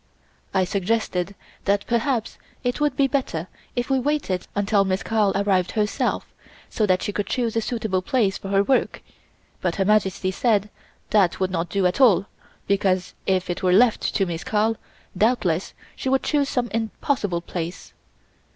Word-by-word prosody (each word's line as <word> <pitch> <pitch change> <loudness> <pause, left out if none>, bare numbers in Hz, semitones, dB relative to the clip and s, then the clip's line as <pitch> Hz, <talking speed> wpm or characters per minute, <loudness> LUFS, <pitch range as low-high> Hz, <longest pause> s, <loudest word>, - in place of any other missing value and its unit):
I 190 - +2
suggested 195 -1 -1 0.3
that 200 0 +1
perhaps 235 -1 -1 0.2
it 245 +3 -1
would 295 -3 +2
be 275 - +3
better 255 - -2 0.3
if 245 0 -1
we 265 - +3
waited 255 -10 -1
until 205 0 +3
Miss 190 0 -1
Carl 215 -3 +2
arrived 195 -2 +1
herself, 210 -1 0 0.5
so 215 - +1
that 185 -1 +2
she 205 - -2
could 205 -1 -2
choose 235 -1 -1
a 225 - +2
suitable 220 -5 -1
place 210 -3 +1
for - - -7
her 195 0 +3
work, 265 +5 0 0.6
but 175 -2 0
Her 195 - +1
Majesty 195 -2 +2
said 210 -1 +1 0.4
that 190 -4 +3
would 185 -1 0
not 170 -1 -2
do 195 +1 0
at 180 +9 +1
all, 215 -7 +6 0.4
because 190 -2 +1
if 185 -1 +1
it 175 - -3
were 180 -1 +3
left 230 +3 +3
to 195 - +2
Miss 170 -2 -4
Carl, 220 +1 +1 0.4
doubtless 190 -4 +1 0.2
she 265 - -3
would 265 0 +2
choose 285 -2 +1
some 245 -2 -1
impossible 220 -4 -1
place. 170 0 -6
200 Hz, 170 wpm, -23 LUFS, 185-230 Hz, 0.6 s, all